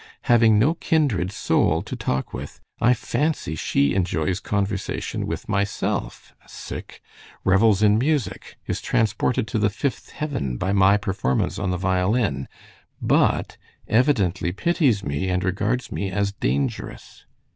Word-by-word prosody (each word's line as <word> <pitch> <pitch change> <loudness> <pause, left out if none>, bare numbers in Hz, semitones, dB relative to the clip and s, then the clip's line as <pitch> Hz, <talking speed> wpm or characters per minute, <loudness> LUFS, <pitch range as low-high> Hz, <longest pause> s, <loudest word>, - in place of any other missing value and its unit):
Having 115 -3 +5
no 135 +10 +4
kindred 140 - 0
soul - - +1
to - - -6
talk 65 - -2
with, - - -7 0.2
I 125 +2 +4
fancy 145 - -1
she 70 -2 +1
enjoys 90 -1 0
conversation 100 -1 -2
with - - -5
myself, 100 -1 -2 1.1
revels 100 +2 +4
in 105 +1 +5
music, 130 -8 -2
is - - -3
transported 110 +1 0
to 110 - -1
the 105 -1 +3
fifth 115 +4 -3
heaven 135 - -3
by 95 +7 -1
my 100 +1 +5
performance 95 - -1
on 95 - -1
the 90 - 0
violin, 95 - 0 0.5
but - - +1 0.3
evidently 105 - +2
pities 125 - +1
me 70 +5 -2
and 90 0 0
regards 105 +7 -1
me 100 - -2
as 100 +1 0
dangerous. 70 -7 -3
100 Hz, 130 wpm, -23 LUFS, 90-115 Hz, 1.1 s, Having